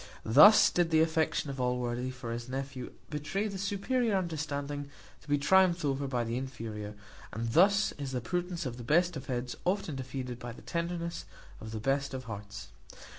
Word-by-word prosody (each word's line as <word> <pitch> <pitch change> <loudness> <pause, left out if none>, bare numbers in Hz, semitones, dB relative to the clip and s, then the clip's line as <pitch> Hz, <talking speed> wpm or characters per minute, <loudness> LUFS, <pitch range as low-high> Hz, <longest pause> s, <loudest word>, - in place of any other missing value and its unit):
Thus 155 - +8
did 175 -2 +2
the 160 -1 +4
affection 160 -3 +1
of 135 -1 -4
Allworthy 125 0 -1
for 130 -2 -6
his 120 +1 -5
nephew 135 -1 -5 0.2
betray 155 +8 -2
the 195 -2 -5
superior 205 +3 0
understanding 145 -5 -3 0.3
to - - -21
be 145 - +3
triumphed 175 +2 +4
over 140 0 0
by 125 -3 0
the 115 +1 -2
inferior; 110 -5 -6 0.4
and 115 +1 -3
thus 200 +5 +5
is 140 -2 -4
the 130 - -1
prudence 175 +6 -3
of 125 -2 -4
the 120 - -7
best 170 +7 +3
of 135 -1 -7
heads 125 -1 -3
often 185 -3 0
defeated 130 -2 -5
by 120 -1 -6
the - - -14
tenderness 170 - -3 0.3
of 110 - -8
the 110 0 -4
best 135 +3 0
of 130 - -5
hearts. 105 -3 -8
140 Hz, 180 wpm, -31 LUFS, 125-170 Hz, 0.4 s, Thus